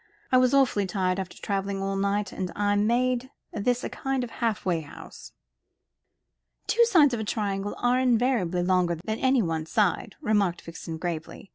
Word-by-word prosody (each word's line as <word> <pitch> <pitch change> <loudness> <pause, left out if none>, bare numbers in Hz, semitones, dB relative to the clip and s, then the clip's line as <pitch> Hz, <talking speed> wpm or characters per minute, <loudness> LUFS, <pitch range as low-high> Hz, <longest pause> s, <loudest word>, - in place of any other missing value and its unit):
I 255 - +6
was 255 -1 +3
awfully 260 -8 +3
tired, 185 0 0
after 190 -1 -6
travelling 195 -1 -2
all 195 0 -2
night; 200 +1 0
and 185 -2 -4
I 205 0 +1
made 245 +4 +1 0.2
this 245 +4 0
a - - -1
kind 270 -1 -2
of 240 - -6
halfway 210 -8 -1
house." 145 - -12 1.3
"Two 470 - +4
sides 320 - +5
of 235 - -1
a - - -2
triangle 205 -2 -2
are 245 +1 +2
invariably 235 -8 +1
longer 180 -1 +2
than 220 +7 -4
any 260 -3 +3
one 160 -2 -2
side," 205 -2 0
remarked 205 - +1
Vixen, 165 -1 -7
gravely. 165 +3 -5
205 Hz, 165 wpm, -26 LUFS, 185-245 Hz, 1.3 s, I